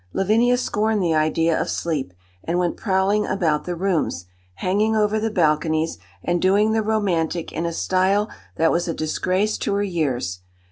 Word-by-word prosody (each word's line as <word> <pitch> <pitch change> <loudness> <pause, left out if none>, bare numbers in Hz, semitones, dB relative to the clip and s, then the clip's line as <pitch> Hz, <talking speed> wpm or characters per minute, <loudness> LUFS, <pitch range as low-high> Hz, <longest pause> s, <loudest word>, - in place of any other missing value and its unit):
Lavinia 230 +6 +3
scorned 215 -4 0
the 165 -2 +1
idea 160 +1 +2
of - - -3
sleep, 150 - -2 0.3
and 170 +2 -1
went 175 -1 0
prowling 195 +1 +1
about 165 -6 0
the 180 - -3
rooms, 170 - -1 0.3
hanging 210 - +1
over 215 0 +2
the 225 +1 -1
balconies, 160 -3 +1 0.2
and 175 0 0
doing 205 +3 +3
the 220 0 +2
romantic 180 -6 -1
in 170 +1 -2
a - - -2
style 190 +4 +1 0.3
that 165 0 +3
was 175 +1 0
a 165 - -2
disgrace 185 +6 -1
to 200 - -1
her 200 - +1
years. 130 - -2
185 Hz, 170 wpm, -22 LUFS, 165-210 Hz, 0.3 s, Lavinia